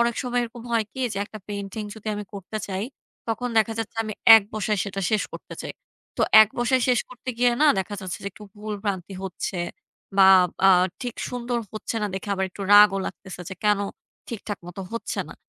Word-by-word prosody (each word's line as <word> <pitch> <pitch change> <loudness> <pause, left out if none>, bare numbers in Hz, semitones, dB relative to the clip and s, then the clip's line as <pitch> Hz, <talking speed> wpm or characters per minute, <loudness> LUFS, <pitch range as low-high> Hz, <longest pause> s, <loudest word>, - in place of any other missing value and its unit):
অনেক 235 0 +2
সময় 245 -1 0
এরকম 235 0 -7
হয় 225 -2 +2
কি 260 - -7
যে 195 - -3
একটা 215 - -10
পেইন্টিং 200 +1 -5
যদি 220 -1 -14
আমি 210 0 -5
করতে 200 +2 -6
চাই 195 +1 -3 0.4
তখন 245 +2 -1
দেখা 220 +1 +2
যাচ্ছে 225 0 -4
আমি 215 - -4 0.2
এক 220 - +3
বসায় 210 -1 -1
সেটা 195 -1 -4
শেষ 215 -2 +2
করতে - - -9
চাই। - - -5 0.4
তো - - +1 0.2
এক 215 - 0
বসায় 245 +1 +2
শেষ 245 -2 +4
করতে 255 0 -12
গিয়ে 245 0 +4
না - - +6
দেখা 190 +2 -3
যাচ্ছে 185 -2 -5
যে - - -1
একটু 210 - -12
ভুল-ভ্রান্তি 200 -3 -4
হচ্ছে 185 0 -4 0.6
বা, 195 - +7 0.4
আ - - +8 0.3
ঠিক 245 -2 -4
সুন্দর 245 -1 -2
হচ্ছে 215 +1 -4
না - - +1
দেখে 195 +2 -5
আবার 190 0 0
একটু 195 - -8
রাগও 205 -1 +8
লাগতেছে, 190 -2 -8
যে - - -6
কেন 210 -1 +4 0.5
ঠিকঠাক 210 -3 -5
মতো 175 +2 -8
হচ্ছে 230 - -4
না? - - -10
210 Hz, 200 wpm, -24 LUFS, 195-235 Hz, 0.6 s, আ